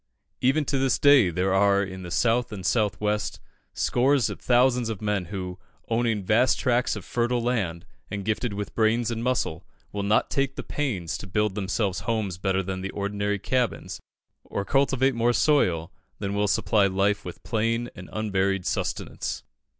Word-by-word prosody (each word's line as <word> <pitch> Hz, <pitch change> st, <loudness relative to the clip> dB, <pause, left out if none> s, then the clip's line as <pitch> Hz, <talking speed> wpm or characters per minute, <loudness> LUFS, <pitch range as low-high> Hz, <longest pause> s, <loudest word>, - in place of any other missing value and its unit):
Even 140 Hz, +4 st, +2 dB
to 135 Hz, 0 st, 0 dB
this 135 Hz, -2 st, +2 dB
day, 140 Hz, -9 st, +6 dB
there 90 Hz, +3 st, 0 dB
are 100 Hz, 0 st, +4 dB
in 95 Hz, -1 st, -6 dB
the 90 Hz, -, -7 dB
South 115 Hz, +8 st, +1 dB
and 95 Hz, -3 st, -6 dB
South 105 Hz, -2 st, +1 dB
West 105 Hz, -2 st, -1 dB, 0.4 s
scores 135 Hz, +1 st, +2 dB
of -, -, -7 dB
thousands 125 Hz, -1 st, +3 dB
of 110 Hz, -4 st, -4 dB
men 105 Hz, -3 st, -1 dB
who, 90 Hz, 0 st, -6 dB, 0.3 s
owning 115 Hz, -3 st, +1 dB
vast 115 Hz, +7 st, +3 dB
tracts 125 Hz, 0 st, +1 dB
of -, -, -8 dB
fertile 120 Hz, 0 st, 0 dB
land, 100 Hz, -8 st, -1 dB, 0.2 s
and 100 Hz, -2 st, -4 dB
gifted 110 Hz, +2 st, -1 dB
with 105 Hz, 0 st, -5 dB
brains 115 Hz, +1 st, +2 dB
and 115 Hz, 0 st, -3 dB
muscle, 115 Hz, -9 st, -1 dB, 0.3 s
will 100 Hz, -, -3 dB
not 105 Hz, +2 st, +2 dB
take 135 Hz, 0 st, 0 dB
the -, -, -5 dB
pains 95 Hz, -, -3 dB
to -, -, -8 dB
build 105 Hz, +2 st, 0 dB
themselves 100 Hz, -1 st, -1 dB
homes 105 Hz, -4 st, -2 dB
better 95 Hz, 0 st, 0 dB
than 95 Hz, 0 st, -4 dB
ordinary 100 Hz, +1 st, -2 dB
cabins, 125 Hz, +3 st, -1 dB, 0.4 s
or 100 Hz, -, -4 dB
cultivate 135 Hz, 0 st, +2 dB
more 120 Hz, +1 st, +2 dB
soil 90 Hz, -, +2 dB, 0.3 s
than 100 Hz, -1 st, -3 dB
will 105 Hz, 0 st, +1 dB
supply 100 Hz, 0 st, +3 dB
life 100 Hz, +2 st, +1 dB
with -, -, -9 dB
plain 115 Hz, +1 st, 0 dB
and 90 Hz, -1 st, -10 dB
unvaried 95 Hz, -3 st, 0 dB
sustenance. -, -, -3 dB
105 Hz, 170 wpm, -26 LUFS, 95-120 Hz, 0.4 s, day